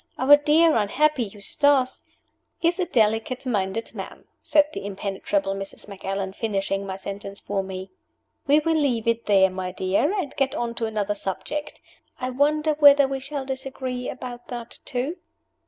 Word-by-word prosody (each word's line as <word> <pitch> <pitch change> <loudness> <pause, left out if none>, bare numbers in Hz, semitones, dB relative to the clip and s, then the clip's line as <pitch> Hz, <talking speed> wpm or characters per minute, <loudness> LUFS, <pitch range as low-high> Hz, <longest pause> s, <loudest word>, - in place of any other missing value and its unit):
Our 275 +3 +8
dear 305 +3 +4
unhappy 255 +5 +2
Eustace 255 +6 +1 0.3
" - - -48
"Is 345 +2 +2
a 365 - +2
delicate 225 0 +1
minded 215 -2 -1
man," - - -8 0.2
said 300 -1 +4
the - - -5
impenetrable 195 0 -2
Mrs. 195 +1 -7
Macallan, 195 -1 -4
finishing 195 -2 -2
my 190 - -4
sentence 200 +1 -7
for 200 -1 -2
me. 190 0 -7 0.6
"We 290 +2 +6
will 325 +1 +1
leave 240 -6 0
it 230 0 0
there, 190 -2 +5
my 185 0 -4
dear, 190 - +1
and 295 -7 -4
get 270 -1 0
on 235 -1 -2
to 235 -1 -2
another 210 -2 -1
subject. 250 +10 -4 0.4
I 255 0 -2
wonder 300 +4 +2
whether 285 -2 +8
we 270 0 -3
shall 275 0 -5
disagree 260 -1 -4
about 245 -1 -7
that 235 -1 -7
too?" 260 +8 -2
240 Hz, 160 wpm, -24 LUFS, 200-280 Hz, 0.6 s, Our